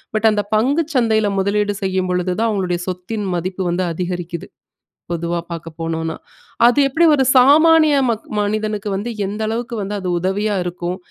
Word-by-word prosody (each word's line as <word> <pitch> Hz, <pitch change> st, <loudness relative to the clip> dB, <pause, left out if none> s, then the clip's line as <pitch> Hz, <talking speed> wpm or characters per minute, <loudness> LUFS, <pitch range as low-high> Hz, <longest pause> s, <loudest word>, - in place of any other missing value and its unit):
but 220 Hz, +1 st, +4 dB
அந்த 210 Hz, -1 st, 0 dB
பங்குச் 285 Hz, +8 st, +1 dB
சந்தையில 220 Hz, -3 st, +2 dB
முதலீடு 205 Hz, +1 st, 0 dB
செய்யும் 185 Hz, -1 st, -1 dB
பொழுது 180 Hz, 0 st, 0 dB
தான், 230 Hz, -, +2 dB
அவுங்களுடைய 185 Hz, -4 st, -1 dB
சொத்தின் 185 Hz, +3 st, -4 dB
மதிப்பு 185 Hz, +2 st, -3 dB
வந்து 180 Hz, +1 st, 0 dB
அதிகரிக்குது, 175 Hz, -1 st, -5 dB, 0.6 s
பொதுவா 170 Hz, 0 st, -2 dB
பார்க்கப்போனுனா 165 Hz, 0 st, -4 dB, 0.5 s
அது 245 Hz, +3 st, +5 dB
எப்பிடி 325 Hz, +5 st, +2 dB
ஒரு 275 Hz, -2 st, +3 dB
சாமானிய 310 Hz, +4 st, +6 dB
மக் 225 Hz, -1 st, -3 dB
மனிதனுக்கு 210 Hz, 0 st, -1 dB
வந்து 205 Hz, +5 st, -3 dB, 0.2 s
எந்த 205 Hz, +3 st, -4 dB
அளவுக்கு 235 Hz, +2 st, -3 dB
வந்து 200 Hz, +1 st, -4 dB
அது 185 Hz, -, -5 dB
உதவியா 200 Hz, +4 st, -1 dB
இருக்கும் 175 Hz, 0 st, -4 dB
205 Hz, 150 wpm, -19 LUFS, 180-225 Hz, 0.6 s, சாமானிய